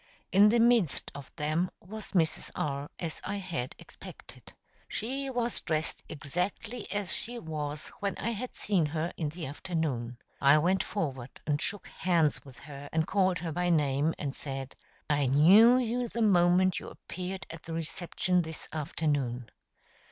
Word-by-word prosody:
In 205 +2 +7
the 235 +2 +4
midst 230 -9 +3
of 140 -1 -9
them 155 +3 0
was 215 +5 -9
Mrs. 165 -4 +1
R., 140 0 -2
as 165 -3 -5
I 200 - -3
had 170 -10 -4
expected. - - -13 0.4
She 270 +5 -3
was 240 -2 -1
dressed 160 -1 -2
exactly 180 - -4
as 205 -2 -1
she 240 +1 -3
was 155 -5 -4
when 200 -2 -2
I 230 - -1
had 240 +3 -5
seen 185 -7 +1
her 160 +3 -2
in 155 -3 -2
the 160 +1 -6
afternoon. 140 -6 -2 0.2
I 140 +2 +7
went 180 +5 +3
forward 135 - -4
and 145 -1 0
shook 205 -2 -3
hands 170 -5 +1
with 135 -3 -14
her 145 -1 -9
and 160 0 +1
called 190 -2 +2
her 170 -2 -4
by 175 +2 0
name, 150 -1 +2
and 140 -2 -3
said: 135 -2 -5 0.3
"I 145 -2 +2
knew 195 - +7
you 245 0 0
the 230 +2 0
moment 185 -2 +4
you - - -8
appeared 185 +1 -6
at 165 -1 -9
the 165 - -7
reception 175 +2 0
this 160 -1 -7
afternoon." 145 -6 -1
165 Hz, 160 wpm, -30 LUFS, 150-200 Hz, 0.4 s, In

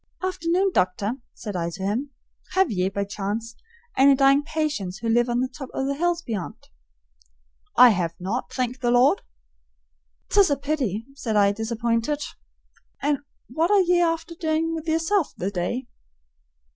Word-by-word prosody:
"Afternoon, 370 +1 +1
Doctor," 185 +2 +1 0.2
said 210 -3 -6
I 170 -1 -1
to 190 +3 -7
him. 225 +9 -1 0.4
"Have 380 -6 +3
ye, 185 -2 0
by 200 +1 -2
chance, 210 +3 -4 0.4
any 275 +1 +6
dying 275 +1 +5
patients 290 - -2
who 230 - -5
live 240 +2 +3
on 240 +1 +1
the 260 - 0
top 265 0 -9
o' 265 - -1
the 280 - 0
hills 345 +3 0
beyant?" 210 - -6 1.1
"I 250 0 +10
have 175 -5 0
not, 200 +8 -3
thank 255 0 -2
the 240 - 0
Lord!" 245 -1 +4 1.1
"'Tis 400 -4 +5
a 285 - +1
pity," 265 - -2
said 235 -6 -3
I, 200 -1 +5
disappointed. 230 +6 -1 0.8
"And 290 -1 +2 0.3
what 320 +8 0
are 410 -1 +5
ye 355 -1 +3
afther 330 0 0
doin' 325 -1 -1
with 325 0 -5
yerself 325 +2 +1
the 190 +3 -2
day?" 205 +8 -2
255 Hz, 160 wpm, -24 LUFS, 210-315 Hz, 1.1 s, I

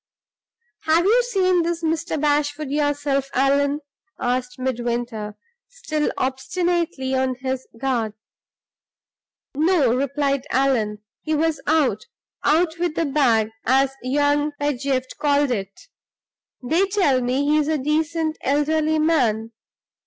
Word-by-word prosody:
"Have 325 +2 +3
you 460 +5 +5
seen 375 -7 +2
this 335 0 -2
Mr. 320 -1 -1
Bashwood 290 0 0
yourself, 290 -2 0
Allan?" 280 +2 +2 0.4
asked 250 0 -2
Midwinter, 240 -4 -3 0.3
still 310 -12 -2
obstinately 280 0 -1
on 260 -1 +1
his 260 0 -4
guard. 235 -5 -1 1.4
"No," 300 -5 +3
replied 275 +1 -1
Allan 230 -6 0 0.2
"he 310 0 -1
was 320 +1 0
out 280 -9 +1 0.4
out 330 +1 +2
with 345 -3 -1
the 330 - 0
bag, 240 -7 +2
as 270 +1 +2
young 290 +3 +1
Pedgift 270 -2 -2
called 285 -2 +2
it. 195 -4 -4 0.8
They 335 +10 +2
tell 370 -10 +2
me 255 +3 0
he's 300 0 +2
a 315 0 +1
decent 310 +2 -1
elderly 310 +3 +1
man. 245 -9 +1
285 Hz, 115 wpm, -22 LUFS, 255-315 Hz, 1.4 s, you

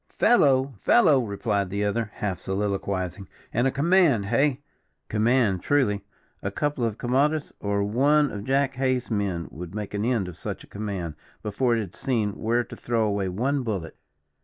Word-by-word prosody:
"Fellow! 135 - +3
fellow!" 155 - +5
replied 100 -3 -1
the 100 +2 -1
other, 110 +1 -1
half 95 -4 -2
soliloquizing, 95 -1 -2 0.3
"and 120 +3 +2
a - - +1
command, 145 - +3
hey! 135 +5 +1 0.5
command, 110 -3 +2
truly; 105 -9 +1 0.4
a - - -2
couple 145 -4 -1
of 115 -2 -1
camaudus, 145 +5 +1
or 100 0 0
one 140 +7 +3
of 100 -1 -5
Jack 135 +1 +1
Hays' 130 -2 0
men 100 -5 -1
would 85 +4 -8
make 105 -1 -5
an 105 0 -1
end 115 -5 +1
of 90 - -9
such - - -6
a - - -18
command, 100 -6 -3 0.3
before 115 +3 +1
it - - 0
had 95 -4 -7
seen 115 -6 0
where 120 +2 +1
to - - -10
throw 115 -2 0
away 100 -3 0
one 130 +9 0
bullet." 100 -9 -4
110 Hz, 170 wpm, -25 LUFS, 100-130 Hz, 0.5 s, fellow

